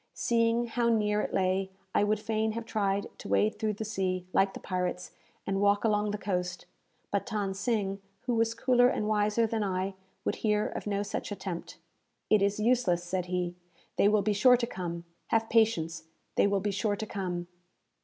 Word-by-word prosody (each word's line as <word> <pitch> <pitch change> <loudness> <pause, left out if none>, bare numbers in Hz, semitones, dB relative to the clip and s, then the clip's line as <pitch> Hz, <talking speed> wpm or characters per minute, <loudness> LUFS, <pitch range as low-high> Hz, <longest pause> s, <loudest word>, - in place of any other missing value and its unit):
Seeing 230 0 +2
how 235 0 0
near 210 -2 +2
it - - -3
lay, 190 0 +1 0.2
I - - +3
would 210 0 +1
fain 220 0 -1
have 230 0 -4
tried 200 -3 0
to - - -8
wade 100 +2 +2
through 215 -1 0
the 215 +2 -5
sea, 185 -4 -1
like 195 0 +3
the - - -6
pirates, 180 -1 -3 0.3
and 195 0 0
walk 205 0 +3
along 210 -2 +2
the 210 - -2
coast; 180 -3 -3 0.5
but 200 - -1
Than 205 -4 -1
Sing, 195 -1 -1 0.2
who 245 - -1
was 230 0 +1
cooler 245 +1 +4
and 215 -4 0
wiser 215 +1 +2
than 220 -1 -1
I, 190 0 -1 0.3
would - - 0
hear 210 -1 +1
of - - -5
no 200 0 0
such 205 - -4
attempt. 190 -3 -5 0.5
"It 215 -2 +6
is 200 +1 +1
useless," 215 -7 +2
said 180 0 -2
he. 180 -1 -1 0.4
"They - - +5
will 210 -1 +3
be 210 - +2
sure 250 +5 +6
to 240 - -1
come. 175 -6 -5 0.2
Have 225 0 +1
patience, 165 -9 +2 0.3
they - - +4
will 200 -1 +1
be 205 +1 0
sure 205 +1 0
to 220 - -4
come." 180 -4 -3
205 Hz, 195 wpm, -29 LUFS, 190-220 Hz, 0.5 s, It